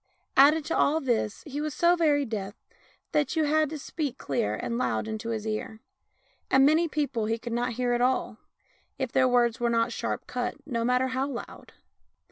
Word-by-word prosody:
Added 295 +3 +6
to 330 - -1
all 305 +3 +3
this 235 -6 -1
he 295 -1 -4
was 305 -3 -3
so 345 +5 +4
very 295 -4 +2
deaf 205 -4 -5 0.6
that 295 -3 +1
you 320 - +2
had 305 0 +2
to 310 - -5
speak 285 -2 -4
clear 105 -6 -1
and 235 - -3
loud 235 - -1
into 220 +1 -4
his 220 -2 -3
ear; 220 0 -4 0.7
and 270 0 +5
many 315 +4 +4
people 285 -8 -1
he 225 +1 0
could 235 0 -6
not 240 +1 -1
hear 245 +1 0
at 240 - 0
all, 250 -3 0 0.6
if 260 -3 -3
their 260 -1 +3
words 245 -1 +2
were 240 0 +1
not 230 0 +1
sharp - - -3
cut, 245 -1 -3
no 235 -5 -2
matter 250 +2 +2
how 260 +1 -1
loud. 260 -4 -8
255 Hz, 195 wpm, -27 LUFS, 230-290 Hz, 0.7 s, Added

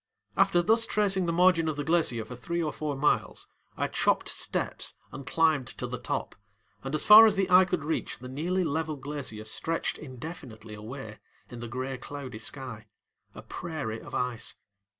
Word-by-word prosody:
After 175 0 +4
thus 225 +4 +3
tracing 195 -4 +2
the - - +1
margin 170 -1 +4
of 155 - -1
the 145 - -3
glacier 155 -9 +2
for 125 - -8
three 170 +7 -2
or 150 - -2
four 150 -2 -3
miles, 145 +2 0 0.3
I - - 0
chopped - - +1
steps - - -2 0.2
and 140 0 -9
climbed 155 -6 +2
to - - -3
the - - -5
top, - - -3 0.5
and 135 +3 -2
as - - 0
far 220 +1 +11
as 210 - +3
the 195 -1 +1
eye 185 +1 +8
could 175 -5 -2
reach, 160 - -2
the 125 - -9
nearly 170 +8 -1
level 160 0 -1
glacier 135 -6 -5
stretched 165 +9 -1
indefinitely 130 -6 -9
away 110 +1 -8 0.3
in 120 - -7
the 120 - -6
gray 130 +2 -4
cloudy 130 -5 -7
sky, 115 -3 -6 0.5
a - - -9
prairie 125 -10 -5
of - - -8
ice. 125 -2 -2
145 Hz, 180 wpm, -28 LUFS, 125-170 Hz, 0.5 s, far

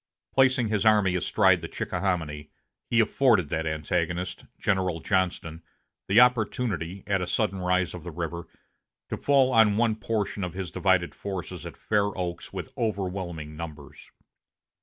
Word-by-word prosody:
Placing 130 -3 +3
his 105 -2 +1
army 105 -4 +4
astride 90 0 +3
the 85 - -5
Chickahominy, 80 -7 -3 0.4
he 115 - +3
afforded 110 - +3
that 80 +2 -1
antagonist, 85 +3 -2
General 95 -4 0
Johnston, 90 -3 -1 0.5
the 100 +4 +5
opportunity, 110 -7 +1
at 100 -2 0
a 90 - -2
sudden 100 0 0
rise 90 0 +1
of 90 -3 -8
the 90 - -6
river, 85 0 -5 0.6
to - - -3
fall 135 -2 +3
on 110 -3 +5
one 115 -1 +2
portion 105 -2 -2
of 90 - -4
his 95 -3 -4
divided 95 -3 +1
forces 95 -6 -6
at - - -10
Fair 100 -2 0
Oaks 90 -2 -4
with - - -7
overwhelming 90 -8 -3
numbers. 75 -3 -9
95 Hz, 145 wpm, -27 LUFS, 85-105 Hz, 0.6 s, the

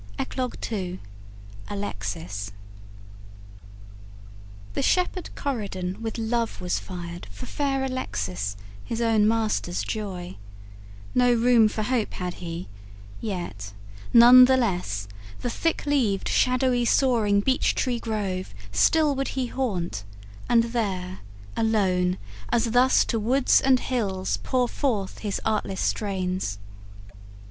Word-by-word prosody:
ECLOGUE 255 -2 -3 0.2
II 185 -4 -3 0.7
ALEXIS 100 - -4 2.2
The - - -1
shepherd 365 0 +1
Corydon 200 -8 -3
with 225 0 -4
love 230 0 -1
was 180 -1 -1
fired 175 -2 -7
For 100 0 -9
fair 275 -2 -1
Alexis, 100 - -3 0.3
his 230 - -4
own 225 -3 +3
master's 215 - 0
joy: 185 - -5 0.8
No 245 0 +4
room 235 -1 +5
for 215 0 -2
hope 240 -1 0
had 180 -1 -3
he, 170 0 -5 0.5
yet, 175 - -5 0.4
none 245 +2 +10
the 260 +1 +4
less, 175 - -1 0.3
The 245 - -2
thick 330 +4 -1
leaved 245 -10 +1
shadowy 255 -1 +2
soaring 230 -5 +3
beech 260 +6 +1
tree 245 -3 0
grove 195 - -3 0.2
Still 295 - +4
would 270 0 -3
he 260 - +1
haunt, 185 - -2 0.5
and 230 -1 +5
there 195 -6 -2 0.4
alone, 190 -5 +2 0.3
as 235 -1 +1
thus, 250 +2 +5
To 225 - -1
woods 250 +5 +3
and 265 -1 +4
hills 195 -8 -1
pour 250 -2 +1
forth 220 -9 -2
his 205 -2 -2
artless 210 -3 -1
strains. 185 - -1
215 Hz, 115 wpm, -25 LUFS, 180-245 Hz, 2.2 s, none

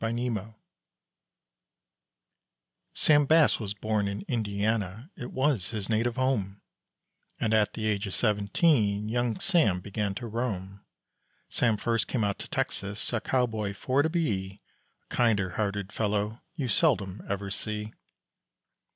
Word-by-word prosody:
SAM 115 +2 -1
BASS 105 -4 -2 2.5
Sam 145 -1 +4
Bass 160 0 +5
was 105 -3 -4
born 105 -1 0
in 100 +1 -4
Indiana, 110 - -1
it 125 -4 -7
was 130 -7 +1
his 105 -3 -4
native 115 +2 +1
home, 110 -7 0 0.8
And 110 - +1
at 105 -1 +3
the 110 - -3
age 105 -1 0
of 95 - -3
seventeen 105 - +2
young 120 0 0
Sam 160 - +3
began 100 +1 -3
to 120 - -5
roam. 100 -4 -4 0.7
Sam 115 -3 +2
first 115 +1 0
came 120 -5 0
out 100 -1 -1
to - - -7
Texas 100 +4 -2
a 115 - 0
cowboy 110 -6 0
for 130 +6 +1
to 160 - +1
be, 105 - -2 0.4
A - - -13
kinder 105 -6 +2
hearted 100 0 -2
fellow 105 +1 -1
you 140 -6 -2
seldom 110 - +2
ever 100 0 -2
see. 105 +1 -4
110 Hz, 135 wpm, -28 LUFS, 100-120 Hz, 2.5 s, Bass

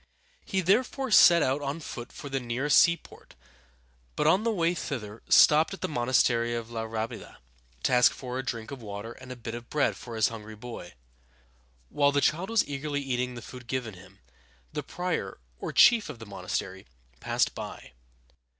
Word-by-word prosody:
He 190 - -1
therefore 250 +7 +1
set 170 -5 +7
out 135 +3 0
on 140 +3 -3
foot 120 -6 -8
for 145 - -9
the 135 -1 -2
nearest 130 +3 +2
seaport, 170 0 0 0.8
but 150 - 0
on 185 +6 +4
the 230 - +1
way 170 -4 +1
thither 115 -10 -5
stopped 155 +5 +6
at - - -19
the - - -1
monastery 120 -3 +1
of 115 0 -5
La 115 -1 -3
Rábida - - -9
(rah´be 110 0 -3
dah) - - -13 0.5
to - - +1
ask 125 0 +6
for 125 -1 -6
a - - -3
drink 115 -2 -5
of 135 -3 -7
water 105 +1 -7
and 130 +1 -11
a - - -5
bit 115 -1 -7
of 120 0 -8
bread 150 -1 +1
for 120 -2 -9
his 110 -1 +3
hungry 110 -1 -9
boy. 110 -5 -9 0.9
While 145 -1 +3
the 145 - +2
child 170 +7 +1
was 230 -3 +2
eagerly 145 0 -3
eating 125 -1 -2
the 120 - -8
food 125 0 -11
given 120 -3 -3
him, 95 +1 -15 0.6
the - - -2
prior, 175 - -3 0.2
or - - -4
chief 235 -6 +6
of 145 - -7
the 115 - -10
monastery, 95 - -5 0.3
passed - - 0
by. - - -8
130 Hz, 190 wpm, -28 LUFS, 115-150 Hz, 0.9 s, set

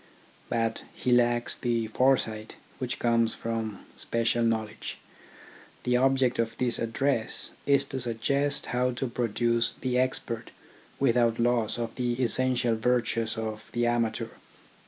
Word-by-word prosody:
But 115 -1 0
he 125 - -1
lacks 120 -1 +3
the 120 -2 -1
foresight 110 -2 +1 0.2
which 125 -2 -3
comes 115 -1 +4
from 115 -3 -4
special 115 0 0
knowledge. 110 -2 -2 0.9
The 125 - +1
ob 135 +2 +3
ject 130 -3 +1
of 115 -1 -1
this 125 -2 +1
address 115 0 0 0.2
is 140 -1 +4
to 135 - -4
suggest 140 +5 0
how 125 +1 +1
to 125 - -3
produce 115 -1 0
the 125 -1 +1
expert 125 -3 -2 0.5
without 120 -3 +3
loss 120 -2 +1
of 115 -1 -3
the 125 -1 0
essential 125 0 +2
virtues 115 -1 0
of 110 -1 -5
the 120 0 +1
amateur. 120 -1 0
120 Hz, 135 wpm, -28 LUFS, 115-125 Hz, 0.9 s, comes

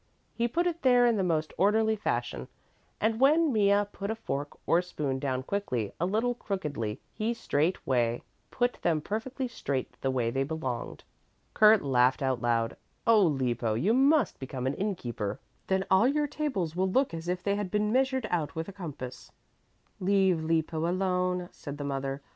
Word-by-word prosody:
He 235 0 0
put 340 +9 0
it 340 -1 -1
there 245 -2 +5
in 235 -1 +4
the 195 - 0
most 160 -3 0
orderly 220 +3 +3
fashion, 210 - -2 0.5
and 220 +1 +1
when 300 +2 +4
Mea 205 -1 +3
put 200 0 -5
a 220 - -1
fork 145 -10 -4
or 170 - +4
spoon 145 -7 -3
down 130 -2 -2
quickly 130 - -2
a 175 - +1
little 225 +5 +1
crookedly, 150 - -4
he 225 +2 -1
straightway 130 - 0 0.3
put 245 0 -1
them 165 -3 +2
perfectly 235 - -3
straight 140 - -3
the 135 - 0
way 125 -3 0
they 135 - -1
belonged. 135 -5 -4 0.5
Kurt 215 -1 +6
laughed 130 0 +3
out 130 -3 0
loud, 115 -1 0 0.3
"Oh, 225 -2 +6
Lippo, 125 - +1
you 190 - +2
must 275 - +3
become 130 -1 -5
an 135 - +1
inn 200 +5 -1
keeper, 115 - -4 0.3
then 190 0 +1
all 190 +5 +6
your 295 +2 +1
tables 260 - -2
will 190 +1 +1
look 260 +1 +1
as 165 +1 -6
if 180 +1 -2
they 200 0 +1
had 205 -2 -3
been 210 +2 0
measured 260 -1 +1
out 160 -5 -1
with 160 0 -3
a 200 - -8
compass." 150 -9 -8 0.7
"Leave 190 -3 +2
Lippo 160 0 0
alone," 180 0 0
said 145 -1 -8
the 145 - -5
mother. 135 0 -3
180 Hz, 175 wpm, -29 LUFS, 135-220 Hz, 0.7 s, Kurt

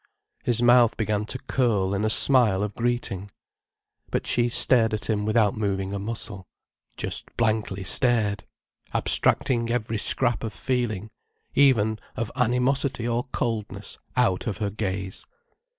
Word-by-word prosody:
His 120 -1 +1
mouth 120 -1 +5
began 105 -1 -1
to 130 - -5
curl 110 -8 0
in 100 +1 -1
a 110 - +1
smile 110 -6 +4
of 105 -1 -3
greeting. 115 -5 -2 0.8
But - - -2
she 120 0 +1
stared 115 -2 +4
at 105 - -3
him 105 -1 -1
without 110 -2 +2
moving 100 -2 -2
a 100 - -3
muscle, 105 -2 -5 0.5
just - - -2
blankly 110 -4 -1
stared, 105 +1 +2 0.5
abstracting 115 -2 +2
every 115 -2 -2
scrap 120 +2 0
of 110 -3 -4
feeling, 110 -2 -2 0.4
even 110 -6 +3 0.2
of 115 - -3
animosity 125 0 0
or 120 +2 -1
coldness, 105 -6 -4 0.2
out 105 -7 +1
of 105 - -2
her 105 -2 -2
gaze. 95 -2 -4
110 Hz, 135 wpm, -25 LUFS, 100-120 Hz, 0.8 s, mouth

